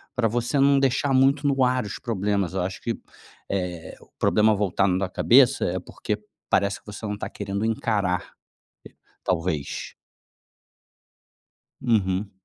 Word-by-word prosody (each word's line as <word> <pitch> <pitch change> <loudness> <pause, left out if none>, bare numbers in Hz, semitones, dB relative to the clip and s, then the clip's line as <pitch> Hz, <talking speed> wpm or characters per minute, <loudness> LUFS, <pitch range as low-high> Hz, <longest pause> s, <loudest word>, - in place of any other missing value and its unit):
pra 120 -2 +2
você 120 +5 0
não 140 0 +5
deixar 135 +1 +1
muito 135 +2 +3
no 135 -2 +2
ar 125 -2 +2
os 105 - -6
problemas. 100 -5 -1
Eu 95 - 0
acho 95 +1 -5
que, 115 - -2 0.5
eh, 90 -3 -3
o - - -18
problema 110 0 +4
voltando 100 -2 +1
na 95 0 -1
cabeça - - +4
é - - -1
porque - - -4 0.3
parece 100 0 +1
que - - -35
você 105 +1 -7
não 105 -1 -2
tá - - -5
querendo 100 0 -4
encarar. 105 -5 0
Eh, - - -39 0.7
talvez. 80 -4 -2 1.9
Uhum. 100 -5 +1
105 Hz, 145 wpm, -24 LUFS, 95-120 Hz, 1.9 s, não